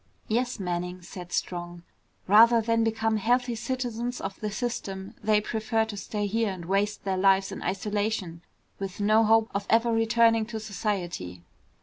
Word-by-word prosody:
"Yes, 240 +1 -1
Manning," 180 -1 -3
said 175 0 -9
Strong. 175 -1 -3 0.4
"Rather 230 +4 +7
than 230 0 +1
become 225 0 +1
healthy 245 +3 +1
citizens 245 0 -3
of 195 0 -6
the 215 - -2
system, 200 -4 -4
they 210 0 +3
prefer 220 +1 -1
to 220 -1 -7
stay 205 +1 -3
here 220 +2 0
and 180 -3 -7
waste 200 +3 0
their 190 -1 -1
lives 195 0 +3
in - - -6
isolation 200 -2 -2 0.4
with 195 0 -5
no 215 +2 +4
hope 225 0 +3
of 200 0 -3
ever 230 +1 +3
returning 225 0 +3
to 225 -1 -5
society." 180 - -4
210 Hz, 155 wpm, -27 LUFS, 190-225 Hz, 0.4 s, Rather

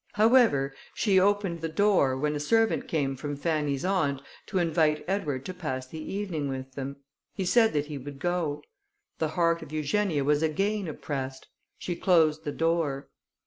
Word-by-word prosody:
However, 215 - +4 0.2
she 195 -4 +3
opened 195 -3 +1
the 165 - -2
door, 160 -8 +3
when 150 +2 0
a - - -2
servant 225 +9 +2
came 140 -4 0
from 145 +2 -4
Fanny's 150 -1 -1
aunt, 160 -8 +1 0.3
to 195 - -2
invite 160 -3 +2
Edward 150 -9 -2
to 185 - -4
pass 130 -8 -4
the 155 +5 -9
evening 170 -6 -3
with 130 0 -5
them. 135 +1 -5 0.4
He 190 - -2
said 225 +4 +4
that 145 -1 0
he 150 -2 -6
would 140 +1 -8
go. 160 -2 -1 0.6
The 160 - +1
heart 170 -1 +2
of - - -10
Eugenia 155 +1 0
was 145 +1 +2
again 195 +5 0
oppressed: 135 -3 -5 0.3
she 175 - -4
closed 160 -3 +3
the 145 - -1
door. 165 -4 0
155 Hz, 170 wpm, -28 LUFS, 145-185 Hz, 0.6 s, However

